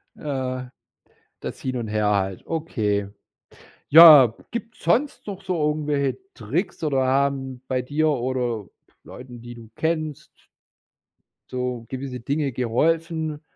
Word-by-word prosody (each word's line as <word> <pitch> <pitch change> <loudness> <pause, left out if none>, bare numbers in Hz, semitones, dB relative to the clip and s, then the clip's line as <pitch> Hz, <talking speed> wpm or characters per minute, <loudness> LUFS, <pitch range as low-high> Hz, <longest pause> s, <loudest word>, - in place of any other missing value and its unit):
Ja, 130 -3 -4 0.7
das - - -6
Hin 130 -1 -3
und 115 -2 -4
Her 105 -1 0
halt. 95 -2 -1
Okay. 105 -11 -1 0.8
Ja, 150 -7 +10 0.2
gibt's 230 -1 -7
sonst 245 - +1
noch 195 -1 -6
so 185 -2 -2
irgendwelche 145 -3 -1 0.2
Tricks, 165 - -3
oder 135 -4 +1
haben 135 -1 0
bei 130 -1 0
dir 150 +4 0
oder 125 -6 -2 0.4
Leuten, 125 -2 -11
die 120 0 -9
du 115 -2 -13
kennst 155 -2 -3 1.0
so 125 -2 -3
gewisse 130 -1 -5
Dinge 140 +3 -1
geholfen? 155 +6 -1
130 Hz, 120 wpm, -23 LUFS, 120-155 Hz, 1.0 s, Ja